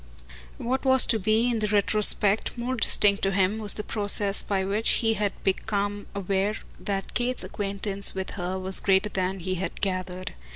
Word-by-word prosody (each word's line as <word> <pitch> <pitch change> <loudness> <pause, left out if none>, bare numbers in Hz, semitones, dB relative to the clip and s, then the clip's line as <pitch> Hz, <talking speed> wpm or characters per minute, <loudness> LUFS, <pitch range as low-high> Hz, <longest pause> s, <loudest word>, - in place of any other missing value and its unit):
What 260 +3 -3
was 265 -1 +5
to 225 - +1
be 220 +4 +1
in 235 -2 -1
the 210 - -1
retrospect 210 +1 +2
more 245 +2 -3
distinct 205 -3 +3
to 195 - +1
him 195 +2 0
was 210 -2 +3
the 210 - -5
process 205 -1 +2
by 195 -2 -2
which 205 +3 +1
he 225 - +2
had 205 -2 -2
become 205 +1 -2
aware 195 +1 -2 0.2
that 195 -1 -5
Kate's 250 +1 -2
acquaintance 200 -1 +1
with 190 0 -5
her 185 0 -5
was 190 0 +2
greater 195 +1 +1
than 190 -1 -3
he 185 +2 -3
had 190 - -5
gathered. 185 -1 -4
200 Hz, 175 wpm, -25 LUFS, 190-215 Hz, 0.2 s, was